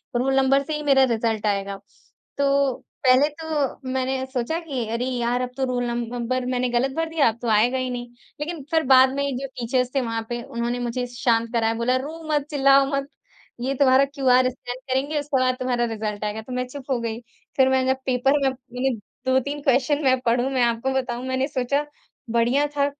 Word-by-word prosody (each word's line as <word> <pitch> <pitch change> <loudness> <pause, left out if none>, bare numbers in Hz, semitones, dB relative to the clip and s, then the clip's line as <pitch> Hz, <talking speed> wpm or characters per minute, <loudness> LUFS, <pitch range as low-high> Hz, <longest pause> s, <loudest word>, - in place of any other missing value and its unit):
Roll 265 +3 +1
number 270 +1 +4
से 310 - -4
ही 300 - -4
मेरा 275 -2 +5
result 225 -3 0
आएगा। 200 -1 -1 0.6
तो 280 -1 +2 0.3
पहले 255 +3 +6
तो 290 -4 -2
मैंने 260 0 -1
सोचा 255 +5 -1
कि 270 -9 -4
अरे 240 +2 -1
यार 245 -1 -1
अब 250 - -2
तो 270 - -1
रोल 250 -1 -1
नंबर, 240 +1 -2
मैंने 250 0 0
गलत 245 +3 +1
भर 325 0 -1
दिया, 315 -6 +3
अब 225 - -6
तो 240 - -3
आएगा 230 +5 +3
ही 255 0 -2
नहीं। 245 -1 -5 0.3
लेकिन 315 -1 -4
फिर 320 -1 +3
बाद 260 0 +6
में 280 - 0
ये 280 - -1
जो 275 - -4
टीचर्स 250 +1 0
थे 270 - +3
वहाँ 230 -2 -3
पे 240 0 -3
उन्होंने 235 +1 -3
मुझे 245 +1 -2
शांत 235 -1 0
कराया 225 -1 +2
बोला, 235 +2 +1
"रो 310 +5 -6
मत, 295 -2 +1
चिल्लाओ 275 -1 +5
मत, 275 0 -2 0.5
ये 265 +2 -1
तुम्हारा 270 0 +5
क्यूआर 255 -3 +3
स्कैन 245 0 -7
करेंगे 285 +4 0
उसके 285 -2 0
बाद 255 0 +2
तुम्हारा 245 -2 0
रिजल्ट 210 -1 -4
आएगा" 210 +1 -3
तो 250 +3 -9
मैं 250 0 -2
चुप 270 +1 -8
हो 250 - +1
गई। 230 -1 -3 0.4
फिर 265 -1 +5
मैंने 260 0 +2
जब - - -9
पेपर 265 +2 +2
में 270 - +4
मैंने 260 0 -3 0.4
2-3 265 +3 +1
क्वेश्चन 280 +2 +2
मैं 260 -1 +3
पढूँ 245 +3 +2
मैं 255 -2 +2
आपको 235 +2 0
बताऊँ 250 -1 -2
मैंने 260 +1 0
सोचा 280 +1 -1 0.5
बढ़िया 240 +5 +2
था 280 - +3
255 Hz, 205 wpm, -23 LUFS, 240-275 Hz, 0.6 s, पहले